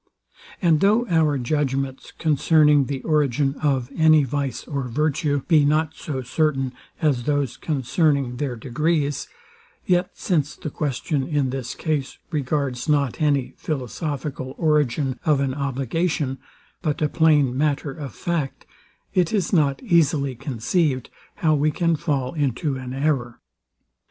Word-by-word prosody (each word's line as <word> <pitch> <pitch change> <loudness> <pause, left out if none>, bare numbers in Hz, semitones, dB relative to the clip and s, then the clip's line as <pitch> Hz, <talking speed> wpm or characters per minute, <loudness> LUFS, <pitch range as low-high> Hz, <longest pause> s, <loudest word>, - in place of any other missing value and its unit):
And 165 -3 +4
though 215 +6 +3
our 160 -4 +3
judgments 135 0 -2
concerning 150 -2 +4
the 135 -1 -4
origin 145 -3 +1
of 135 -4 0
any 155 -2 +5
vice 140 0 -2
or 140 -3 -3
virtue, 145 +2 0
be 155 -4 +5
not 155 +2 +2
so 135 -5 -5
certain 135 -1 0 0.3
as 135 -6 +2
those 145 -4 0
concerning 140 -2 0
their 135 -2 -2
degrees; 145 +4 -1 0.6
yet, 180 0 +2
since 155 -5 0
the 155 - -6
question 140 0 -2
in 145 -5 0
this 130 -2 -4
case 150 -4 -2
regards 140 -3 -1
not 145 -2 +1
any 145 -4 +1
philosophical 135 -1 -4
origin 145 -5 +1
of 150 -3 +3
an 135 -1 0
obligation, 140 +1 -1 0.4
but 150 -4 -1
a - - +4
plain 150 -5 +3
matter 145 0 0
of 140 -3 -8
fact, 165 -6 -3 0.5
it 180 -3 +2
is 200 -3 0
not 145 - +2
easily 150 - +2
conceived 130 +3 -1 0.2
how 155 -2 +2
we 150 +1 +2
can 170 +2 +1
fall 145 -5 -1
into 145 -1 -1
an 130 -1 -6
error. 135 -3 -1
145 Hz, 135 wpm, -23 LUFS, 135-155 Hz, 0.6 s, any